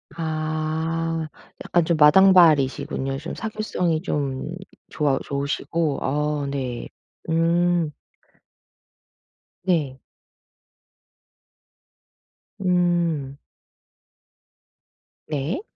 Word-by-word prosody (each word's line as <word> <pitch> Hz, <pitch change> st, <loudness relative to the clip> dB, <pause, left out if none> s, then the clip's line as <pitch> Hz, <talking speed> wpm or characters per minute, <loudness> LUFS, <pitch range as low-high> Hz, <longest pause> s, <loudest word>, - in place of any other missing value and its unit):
아 160 Hz, 0 st, -2 dB, 0.4 s
약간 175 Hz, -1 st, +2 dB
좀 170 Hz, -2 st, +1 dB
마당발이시군요. 150 Hz, -5 st, +5 dB
좀 150 Hz, +4 st, -6 dB
사교성이 210 Hz, -7 st, -2 dB
좀 140 Hz, -4 st, -2 dB, 0.4 s
좋아 145 Hz, -3 st, 0 dB
좋으시고. 140 Hz, +2 st, -2 dB
어 150 Hz, +1 st, -1 dB
네. 130 Hz, -4 st, -4 dB, 0.4 s
음. 170 Hz, 0 st, +2 dB, 1.7 s
네. 155 Hz, -8 st, 0 dB, 2.7 s
음. 170 Hz, -6 st, +1 dB, 1.9 s
네. 150 Hz, -, -2 dB
155 Hz, 110 characters per minute, -23 LUFS, 140-170 Hz, 2.7 s, 마당발이시군요